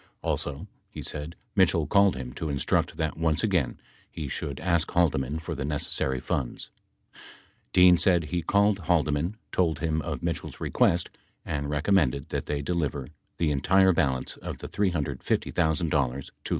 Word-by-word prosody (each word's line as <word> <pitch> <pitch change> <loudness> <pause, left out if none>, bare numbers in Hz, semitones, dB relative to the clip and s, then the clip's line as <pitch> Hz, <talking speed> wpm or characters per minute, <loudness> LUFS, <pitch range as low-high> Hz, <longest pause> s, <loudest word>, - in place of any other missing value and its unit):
Also, 75 +5 -3 0.2
he - - -8
said, 75 +2 -5 0.2
Mitchell - - +3
called 100 -1 +4
him 65 -2 -6
to 80 - -4
instruct 70 -1 0
that 80 -1 -2
once 80 -2 +1
again - - 0 0.3
he 75 -3 -6
should 70 +1 -4
ask 85 -3 +1
Haldeman 75 -5 +1
for 80 +1 -5
the 70 -2 -4
necessary 70 -2 0
funds. 60 0 -3 1.0
Dean 90 -1 +7
said 90 -2 +4
he 85 +4 -2
called 100 +2 +2
Haldeman 80 +1 +1 0.2
told 85 -4 +1
him 80 -1 -1
of - - -5
Mitchell's - - -3
request 85 0 +1 0.3
and 70 -1 -3
recommended 75 -3 +1
that - - -3
they 70 -1 -2
deliver 70 -5 -2 0.3
the 80 -3 +1
entire 95 +7 +4
balance 65 -5 0
of - - -6
the - - -7
$350,000 80 -9 -1
to 80 -2 +2
LaRue. 65 +1 -3
80 Hz, 150 wpm, -27 LUFS, 70-85 Hz, 1.0 s, Dean